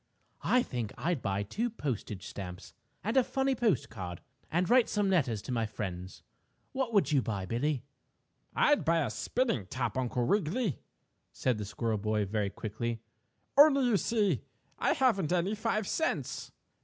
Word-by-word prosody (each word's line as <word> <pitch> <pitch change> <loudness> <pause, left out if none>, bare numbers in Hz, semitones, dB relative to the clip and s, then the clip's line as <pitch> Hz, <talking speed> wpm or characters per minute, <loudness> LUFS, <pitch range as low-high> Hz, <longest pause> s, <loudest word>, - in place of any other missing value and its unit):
I 250 0 +4
think 120 -4 -4
I'd 170 -6 -1
buy 100 0 -1
two 220 - -2
postage 125 - -4
stamps 90 -2 -7 0.3
and 220 +5 -1
a 260 - +6
funny 270 +2 0
postcard 115 - -1 0.3
and 175 +2 +1
write 245 +1 +5
some 205 -2 +1
letters 130 - +1
to - - -5
my 115 -3 0
friends. 95 -4 -6 0.5
What 265 -3 -1
would 200 -6 +3
you 140 -3 +4
buy, 100 -5 -3
Billie?" 125 +6 -1 0.7
"I'd 295 -1 +4
buy 165 0 +3
a 110 - -3
spinning 120 - -1
top, 120 0 -2
Uncle 125 -1 0
Wiggily," 200 - +1 0.5
said 125 -4 0
the - - -5
little 100 - -5
squirrel 115 0 -1
boy, 105 0 0
very 100 0 -1
quickly. 115 +3 -4 0.6
"Only, 280 -2 +7
you 235 -4 +4
see, 205 - +1 0.4
I - - +3
haven't 210 - +2
any 180 +3 +1
five 215 -1 -1
cents. 320 - -2
140 Hz, 160 wpm, -31 LUFS, -, 0.7 s, Only